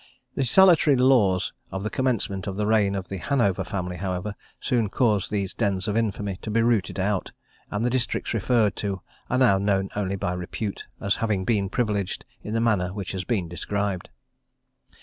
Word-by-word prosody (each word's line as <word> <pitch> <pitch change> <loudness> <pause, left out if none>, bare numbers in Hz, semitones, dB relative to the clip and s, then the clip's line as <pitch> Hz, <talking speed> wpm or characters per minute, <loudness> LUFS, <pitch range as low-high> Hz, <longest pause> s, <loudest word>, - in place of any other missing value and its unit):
The 135 - 0
salutary 165 0 +6
laws 120 -8 +3 0.2
of 95 0 -4
the 110 - -2
commencement 115 -7 -1
of 95 - -3
the 105 +1 -1
reign 105 -2 +3
of 95 -1 -4
the 95 - -4
Hanover 110 -4 +1
family, 90 -2 -4
however, 95 +2 -3 0.3
soon 120 -6 +1
caused 105 -5 +1
these 100 -2 -2
dens 100 -4 -1
of 105 - 0
infamy 105 -4 -1
to - - -5
be 115 +2 +2
rooted 115 -5 +1
out; 100 0 -1 0.4
and 105 +3 -1
the - - +3
districts 125 -1 -1
referred 115 -1 +2
to 100 -2 -3 0.3
are 130 - +1
now 120 -7 +5
known 95 -1 +1
only 100 -1 -1
by 90 -2 -2
repute, 90 +3 -4
as 100 - 0
having 105 -5 0
been 100 -3 +1
privileged 105 -4 -1 0.2
in 105 - -4
the - - +2
manner 100 -6 +2
which 100 -1 -5
has 95 -1 -4
been 100 -8 0
described. 100 +2 -3
100 Hz, 185 wpm, -25 LUFS, 95-115 Hz, 0.4 s, salutary